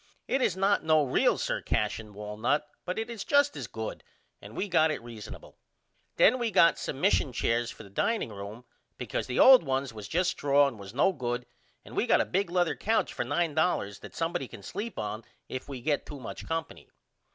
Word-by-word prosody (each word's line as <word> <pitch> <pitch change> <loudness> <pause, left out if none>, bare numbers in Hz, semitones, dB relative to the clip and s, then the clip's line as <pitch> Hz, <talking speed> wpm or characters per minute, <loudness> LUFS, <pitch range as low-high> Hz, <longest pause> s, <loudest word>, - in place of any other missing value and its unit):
It 270 - +1
is 190 -7 +1
not 195 +1 +2
no 155 -1 +4
real 130 - +2
Sir - - -2
Cashion 105 0 -2
walnut 105 +8 -1 0.2
but 180 - -3
it 225 0 -2
is 230 -4 -6
just 285 0 +3
as - - -5
good - - -6 0.4
and - - -11
we 205 - -1
got 160 -4 +4
it 155 - -2
reasonable. 115 -3 -10 0.6
Then 255 +4 +5
we 235 -1 0
got 170 -5 +5
some 135 - -4
mission 180 -6 +2
chairs 120 0 0
for 115 - -10
the 100 - -13
dining 225 - 0
room 105 +3 -8 0.3
because - - -3
the 125 - -3
old 260 -1 +9
ones 135 -3 -2
was 105 -2 -8
just 180 +2 +1
straw 145 0 +3
and 120 -6 -6
was 100 +3 -10
no 190 +8 +3
good 125 -4 -3 0.4
and - - -11
we - - +1
got - - +5
a - - +2
big 195 -1 0
lether 175 -1 +1
couch 225 +2 0
for - - -2
$9 155 - 0
that - - -12
somebody 165 -4 -2
can 100 - -12
sleep 225 - -5
on 105 +2 -4 0.2
if 130 +2 -6
we 130 -3 -6
get 145 +2 -1
to 145 - -8
much 125 - -8
company. 165 0 -4
145 Hz, 210 wpm, -29 LUFS, 120-185 Hz, 0.6 s, old